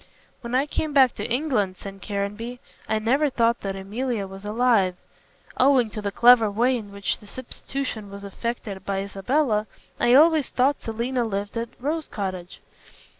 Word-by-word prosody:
"When 235 0 -3
I 265 +2 +3
came 300 0 -3
back 265 -3 +6
to - - -5
England," 235 -9 0
said 195 0 -9
Caranby, 210 +5 -4 0.3
"I 220 - +2
never 265 +7 +2
thought 235 -2 +1
that 195 -1 -3
Emilia 210 +3 -3
was 195 +1 -10
alive. 210 -4 +2 0.6
Owing 255 -4 +4
to 215 - -5
the 200 -1 -2
clever 235 0 +6
way 240 +5 +2
in 210 -4 -6
which 200 0 -2
the 210 - -15
substitution 255 -2 -5
was 200 0 -9
effected 205 -1 -5
by 195 -1 -1
Isabella, 215 +3 0 0.3
I 240 +1 +5
always 310 0 +5
thought 270 +3 +1
Selina 235 +3 -1
lived 205 -1 -3
at 230 0 -2
Rose 305 +4 -2
Cottage. 185 -4 -5
230 Hz, 165 wpm, -24 LUFS, 200-255 Hz, 0.6 s, back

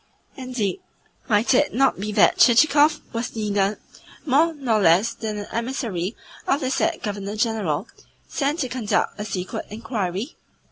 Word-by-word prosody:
Indeed, 255 - -3 0.5
might 215 0 +3
it 290 +1 +2
not 270 -5 +2
be 210 +2 -3
that - - +4
Chichikov 290 +5 +5
was 230 +1 -4
neither 205 -2 0 0.5
more 310 +4 +3
nor 250 -8 0
less 190 +6 +4
than 220 -2 -5
an 205 - -6
emissary 230 -6 -3 0.3
of 275 - +2
the 260 -1 -1
said 335 +4 0
Governor 205 -1 -4
General, 215 -9 -1 0.4
sent 295 +3 -1
to 260 - 0
conduct 235 -4 -1
a - - -2
secret 185 -3 -4
inquiry? 215 - -4
230 Hz, 145 wpm, -23 LUFS, 205-265 Hz, 0.5 s, Chichikov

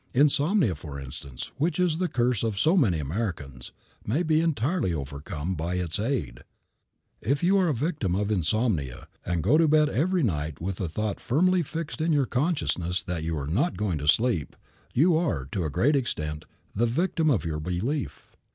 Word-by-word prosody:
Insomnia, 150 - +3
for 75 -2 -8
instance, 65 -1 -8
which 160 +4 0
is 175 -3 +2
the 185 - +1
curse 120 - +1
of 110 -3 -1
so 160 - +3
many 110 - +3
Americans, 75 - -4 0.3
may 140 +12 0
be 155 -1 +3
entirely 160 - 0
overcome 75 +4 -4
by 85 +2 -2
its 90 0 -2
aid. 105 - -2 0.8
If 140 +5 0
you 195 +3 +4
are 185 - +3
a 155 - +2
victim 125 - -1
of 105 +2 0
insomnia, 90 - 0 0.2
and 85 -3 -1
go 140 - +4
to 165 - +5
bed 155 0 +4
every 175 +5 +1
night 75 - -1
with 90 +2 -3
the 90 - -2
thought 105 +5 -2
firmly 180 +7 +2
fixed 160 0 -5
in 165 +1 +1
your 145 -3 +3
consciousness 110 - 0
that 90 -4 -3
you 80 0 -2
are 70 - -3
not 115 - 0
going 95 -7 -1
to 75 - -4
sleep, 100 - +2 0.4
you 160 +6 +4
are, 155 - 0
to 90 -4 -1
a - - -1
great 115 - +2
extent, 75 - -2 0.3
the 120 +4 +2
victim 160 +5 +1
of 115 - +1
your 80 -2 -2
belief. 95 - -3
110 Hz, 185 wpm, -27 LUFS, -, 0.8 s, to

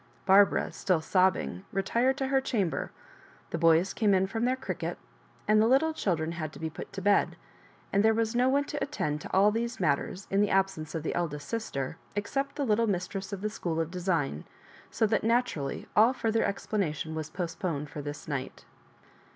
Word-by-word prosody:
Barbara, 195 +1 +5
still 185 -4 +1
sobbing, 155 - +1
retired 235 +7 +1
to 265 -1 -1
her 270 0 +3
chamber; 205 -10 -1 0.6
the 165 - -2
boys 165 +3 +4
came 210 -4 +3
in 190 0 +3
from 225 +4 -2
their 255 +1 +2
cricket^ 260 - -4 0.5
and 215 0 +5
the 220 - +4
little 280 +6 +3
children 165 - -1
had 155 -3 -4
to - - -11
be 160 -1 -3
put - - -8
to 195 - -6
bed; 205 0 +3 0.6
and 200 +1 +4
there 220 - +6
was 225 0 0
no 250 +2 +4
one 280 +2 +3
to 290 0 -5
attend 150 - -2
to - - -8
all 200 +2 +5
these 235 +2 -2
matters, 155 +6 0
in 195 +1 +3
the 205 - +2
absence 190 -6 0
of 160 - -3
the - - -2
eldest 150 -4 -3
sister, 160 - -3 0.2
except 275 +7 -2
the 285 - -1
little 230 0 +2
mistress 190 0 -3
of 200 -2 -5
the 215 - -1
school 165 -6 -3
of 165 0 -1
design, 170 - -1 0.5
so 225 - +1
that 220 0 +1
naturally 225 - 0
all 225 +4 +6
fUrther 225 -2 +1
explanation 165 -6 -2
was 155 -1 -4
postponed 165 -3 -3
for 150 0 -7
this 145 0 -7
night. 140 -3 -5
195 Hz, 190 wpm, -29 LUFS, 160-225 Hz, 0.6 s, there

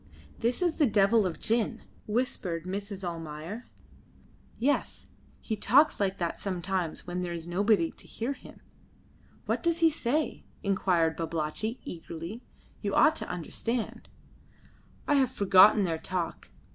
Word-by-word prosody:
"This 240 +8 0
is 345 -2 +1
the 295 - +4
devil 210 0 +4
of 175 - -5
gin," 230 0 0 0.2
whispered 210 -7 -1
Mrs. 200 +1 -4
Almayer. 165 +6 -6 0.9
"Yes; 280 +5 -1 0.3
he 220 - -3
talks 265 +9 +4
like 195 -1 0
that 170 -1 -2
sometimes 185 -3 -2
when 180 0 -3
there 175 -1 -3
is 165 -1 -6
nobody 185 0 +2
to - - -17
hear 240 +5 -3
him." 270 - -14 0.8
"What - - 0
does 340 -1 +1
he 330 -1 +5
say?" 295 +1 -1 0.2
inquired 180 -5 +2
Babalatchi, 165 +8 -3
eagerly. 170 +6 -7 0.4
"You - - -1
ought 315 - +6
to - - -4
understand." 220 +7 -3 1.0
"I - - +3
have 265 -3 +3
forgotten 200 -2 +6
their 165 -3 -1
talk. 180 -1 -4
200 Hz, 135 wpm, -29 LUFS, 170-235 Hz, 1.0 s, ought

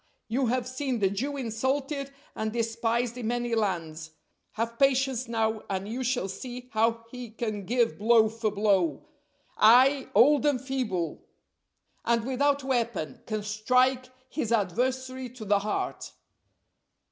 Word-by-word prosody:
you 250 +3 0
have 250 +1 0
seen 255 -1 -2
the 195 -3 +1
Jew 275 +8 -2
insulted 270 +4 -2 0.2
and 220 0 -3
despised 230 +1 -1
in 230 - -3
many 240 0 -1
lands; 165 -7 -2 0.4
have 230 +1 -3
patience 265 -2 +2
now 220 -1 0
and 195 0 -2
you 245 +4 -3
shall 250 -4 0
see 245 +6 -8
how 230 +1 +1
he 250 -2 -7
can 215 -3 -4
give 235 -2 +1
blow 220 +1 +5
for 225 0 -2
blow; 200 -7 +1 0.5
ay! 260 +5 +6
old, 280 +7 +6
and 280 -4 +2
feeble, 235 - -3 0.8
and 230 -1 +1
without 280 +2 +1
a - - -8
weapon, 235 -10 -2
can 215 -1 -2
strike 250 +5 +1 0.2
his 245 -5 -3
adversary 255 +5 -1
to 240 -2 -10
the 205 0 +3
heart." 210 +1 -3
235 Hz, 140 wpm, -28 LUFS, 215-255 Hz, 0.8 s, ay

